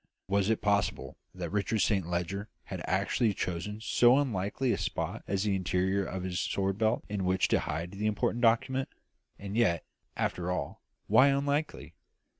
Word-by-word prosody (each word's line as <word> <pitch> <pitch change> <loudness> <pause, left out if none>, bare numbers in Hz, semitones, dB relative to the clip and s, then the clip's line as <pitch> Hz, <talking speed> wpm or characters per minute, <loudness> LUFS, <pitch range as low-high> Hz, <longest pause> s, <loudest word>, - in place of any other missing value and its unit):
Was 100 +1 +1
it 110 - 0
possible 100 -1 0 0.2
that 90 -3 -5
Richard 105 +2 0
Saint 95 -2 +1
Leger 90 +4 -2
had - - -6
actually 110 -4 +1
chosen 90 +5 -3
so 120 +3 +4
unlikely 120 -1 0
a - - +1
spot - - -3
as 95 0 0
the 105 -2 +1
interior 95 +1 0
of 95 -1 -4
his 90 -1 -2
sword 95 +1 -1
belt 110 +1 +1
in 100 -2 -3
which 95 0 +2
to - - +3
hide 80 +4 -3
the 105 +2 -2
important 110 +2 0
document? 130 +3 +2 0.5
And 100 +1 -6
yet, 105 -8 +2 0.3
after 90 0 -1
all, 90 - -3 0.2
why 130 - +6
unlikely? 140 +2 -1
100 Hz, 165 wpm, -30 LUFS, 95-115 Hz, 0.5 s, why